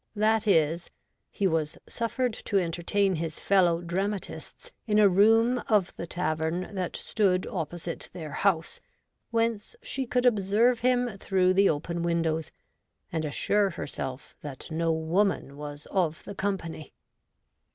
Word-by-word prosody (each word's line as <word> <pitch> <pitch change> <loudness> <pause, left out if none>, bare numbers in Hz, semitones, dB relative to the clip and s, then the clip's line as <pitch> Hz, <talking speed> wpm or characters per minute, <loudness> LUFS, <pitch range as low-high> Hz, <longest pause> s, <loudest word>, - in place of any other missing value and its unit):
That 215 +1 +2
is, 165 -2 +2 0.4
he 200 - -2
was 160 -4 0
suffered 240 +1 -1
to 205 - -2
entertain 185 +3 +1
his 160 0 -4
fellow 175 -3 +3
dramatists 195 - -4 0.2
in 210 -1 +2
a 210 -1 +7
room 225 +6 +4
of 205 -5 +2
the 170 - -6
tavern 165 +2 -2
that 185 -3 -3
stood 185 -4 +1
opposite 170 -1 -5
their 160 -4 -7
house, 165 -1 0 0.5
whence 230 - -1
she 270 - -3
could 250 +1 +1
observe 225 +2 +3
him 245 -4 +1
through 185 -2 +2
the 195 +1 +5
open 170 +3 -2
v.'indows, 165 -2 0 0.6
and 160 -1 -1
assure 200 +7 +1
herself 140 -4 -6
that 145 +1 -8
no 165 +1 +1
woman 160 -1 0
was 145 0 -8
of 170 -5 0
the - - -7
company. 190 -6 -4
185 Hz, 135 wpm, -28 LUFS, 165-210 Hz, 0.6 s, a